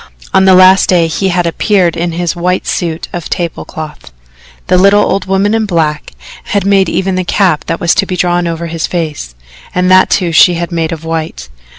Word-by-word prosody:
On 190 Hz, -, +4 dB
the 190 Hz, -1 st, +6 dB
last 185 Hz, +1 st, +5 dB
day 175 Hz, -3 st, +3 dB
he 170 Hz, +4 st, -2 dB
had 175 Hz, -1 st, 0 dB
appeared 175 Hz, +1 st, +1 dB
in 170 Hz, 0 st, -3 dB
his 175 Hz, +1 st, -2 dB
white 180 Hz, +1 st, -1 dB
suit 165 Hz, -2 st, -3 dB
of 175 Hz, -2 st, -6 dB
tablecloth. 160 Hz, -, -6 dB, 0.5 s
The 185 Hz, -, +1 dB
little 200 Hz, +2 st, +4 dB
old 195 Hz, -, -1 dB
woman 195 Hz, +2 st, 0 dB
in 225 Hz, -1 st, 0 dB
black 155 Hz, -5 st, -2 dB, 0.3 s
had 200 Hz, -2 st, -1 dB
made 195 Hz, -1 st, +2 dB
even 190 Hz, 0 st, -1 dB
the 185 Hz, 0 st, -1 dB
cap 175 Hz, -3 st, 0 dB
that 165 Hz, -, -3 dB
was 170 Hz, -, +2 dB
to 195 Hz, -, 0 dB
be 185 Hz, -, -3 dB
drawn 175 Hz, 0 st, 0 dB
over 170 Hz, 0 st, -4 dB
his 165 Hz, -1 st, -3 dB
face, 155 Hz, -, -5 dB, 0.4 s
and 180 Hz, +1 st, +1 dB
that, 185 Hz, 0 st, +5 dB
too, 180 Hz, -3 st, 0 dB
she 175 Hz, +2 st, +5 dB
had 170 Hz, +1 st, -4 dB
made 165 Hz, -2 st, -2 dB
of 165 Hz, -1 st, -6 dB
white. 160 Hz, -, -5 dB
175 Hz, 205 wpm, -11 LUFS, 165-190 Hz, 0.5 s, the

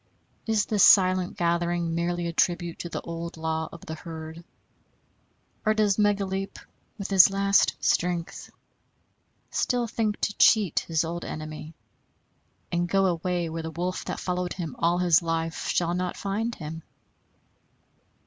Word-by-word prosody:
Is 220 Hz, -2 st, +2 dB
this 210 Hz, -3 st, +2 dB
silent 185 Hz, -2 st, +5 dB
gathering 170 Hz, 0 st, 0 dB
merely 175 Hz, +1 st, -1 dB
a 170 Hz, -, -3 dB
tribute 175 Hz, 0 st, 0 dB
to 170 Hz, -, -5 dB
the -, -, -4 dB
old 170 Hz, 0 st, -6 dB
law 160 Hz, 0 st, -2 dB
of 170 Hz, -, -11 dB
the 160 Hz, -, -5 dB
herd, 160 Hz, 0 st, -8 dB, 1.2 s
or 215 Hz, 0 st, +2 dB
does 210 Hz, -2 st, +2 dB
Megaleep, 195 Hz, -2 st, 0 dB, 0.4 s
with 200 Hz, -2 st, -5 dB
his 190 Hz, -1 st, +8 dB
last 195 Hz, 0 st, +3 dB
strength, 175 Hz, -1 st, -1 dB, 1.0 s
still 245 Hz, -1 st, 0 dB
think 220 Hz, -2 st, -2 dB
to 205 Hz, -, 0 dB
cheat 210 Hz, -7 st, +5 dB
his 165 Hz, -1 st, +1 dB
old 170 Hz, +1 st, -4 dB
enemy, 155 Hz, +1 st, -7 dB, 1.0 s
and 175 Hz, 0 st, 0 dB
go 195 Hz, +2 st, +3 dB
away 175 Hz, -1 st, 0 dB
where 165 Hz, 0 st, -4 dB
the 160 Hz, -, -5 dB
wolf 180 Hz, +3 st, -3 dB
that -, -, -4 dB
followed 180 Hz, -1 st, -2 dB
him 165 Hz, -6 st, -5 dB
all 170 Hz, +1 st, +2 dB
his 175 Hz, -3 st, +4 dB
life 165 Hz, -1 st, -2 dB
shall 170 Hz, -1 st, +1 dB
not 180 Hz, 0 st, -2 dB
find 220 Hz, +4 st, -2 dB
him? 160 Hz, +1 st, -7 dB
175 Hz, 145 wpm, -26 LUFS, 165-195 Hz, 1.2 s, his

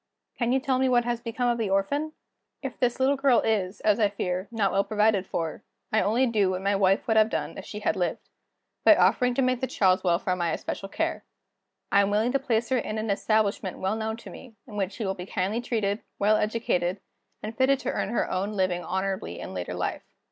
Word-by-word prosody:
Can 240 Hz, -1 st, +1 dB
you 265 Hz, -, +3 dB
tell 260 Hz, -1 st, 0 dB
me 260 Hz, 0 st, +2 dB
what 240 Hz, -1 st, +3 dB
has 240 Hz, -1 st, -1 dB
become 245 Hz, +1 st, -2 dB
of 240 Hz, -1 st, +1 dB
the 220 Hz, -3 st, -1 dB
orphan? 280 Hz, +11 st, 0 dB, 0.5 s
If -, -, -4 dB
this 245 Hz, 0 st, +1 dB
little 270 Hz, +2 st, +3 dB
girl 270 Hz, -3 st, +4 dB
is, 200 Hz, -3 st, -1 dB
as 215 Hz, +1 st, +3 dB
I 210 Hz, -2 st, +4 dB
fear, 185 Hz, -1 st, -3 dB
not 220 Hz, -4 st, 0 dB
well 195 Hz, -, +2 dB
provided 210 Hz, -3 st, +1 dB
for, 165 Hz, +4 st, -3 dB, 0.3 s
I 220 Hz, -, +3 dB
only 235 Hz, +5 st, +2 dB
do 215 Hz, -6 st, +2 dB
what 185 Hz, 0 st, -3 dB
my 200 Hz, +1 st, +2 dB
wife 195 Hz, 0 st, +2 dB
would 220 Hz, -1 st, +2 dB
have 215 Hz, 0 st, +5 dB
done -, -, -3 dB
if -, -, -8 dB
she 210 Hz, -, -7 dB
had 215 Hz, -, +1 dB
lived, 180 Hz, -2 st, -2 dB, 0.6 s
by -, -, +8 dB
offering 250 Hz, -1 st, +3 dB
to 270 Hz, -, +2 dB
make 255 Hz, -1 st, +1 dB
the 260 Hz, -, 0 dB
child's 185 Hz, -5 st, +2 dB
welfare 180 Hz, +1 st, +1 dB
my 170 Hz, -2 st, -1 dB
especial 195 Hz, -, -5 dB
care. -, -, -2 dB, 0.7 s
I 200 Hz, -, +6 dB
am 200 Hz, -, +1 dB
willing 215 Hz, +4 st, +1 dB
to 275 Hz, -, +1 dB
place 235 Hz, -3 st, 0 dB
her 260 Hz, -1 st, +2 dB
in 215 Hz, -, -4 dB
an 215 Hz, -1 st, -1 dB
establishment 205 Hz, -2 st, 0 dB
well 190 Hz, +3 st, -1 dB
known 220 Hz, 0 st, -3 dB
to -, -, -11 dB
me, 245 Hz, -4 st, -12 dB
in 215 Hz, -, -11 dB
which 195 Hz, -1 st, -2 dB
she 220 Hz, -, -4 dB
will 190 Hz, -, 0 dB
be 180 Hz, 0 st, -8 dB
kindly 200 Hz, +5 st, -1 dB
treated, 220 Hz, -3 st, -1 dB, 0.2 s
well 210 Hz, +2 st, +3 dB
educated, 210 Hz, -4 st, 0 dB, 0.4 s
and 215 Hz, +1 st, -5 dB
fitted 265 Hz, +3 st, +3 dB
to -, -, -2 dB
earn -, -, -2 dB
her 235 Hz, -, 0 dB
own 195 Hz, +3 st, -2 dB
living 185 Hz, -3 st, 0 dB
honorably 190 Hz, -, -3 dB
in -, -, -7 dB
later 90 Hz, -1 st, -4 dB
life. -, -, -2 dB
215 Hz, 230 wpm, -26 LUFS, 190-235 Hz, 0.7 s, by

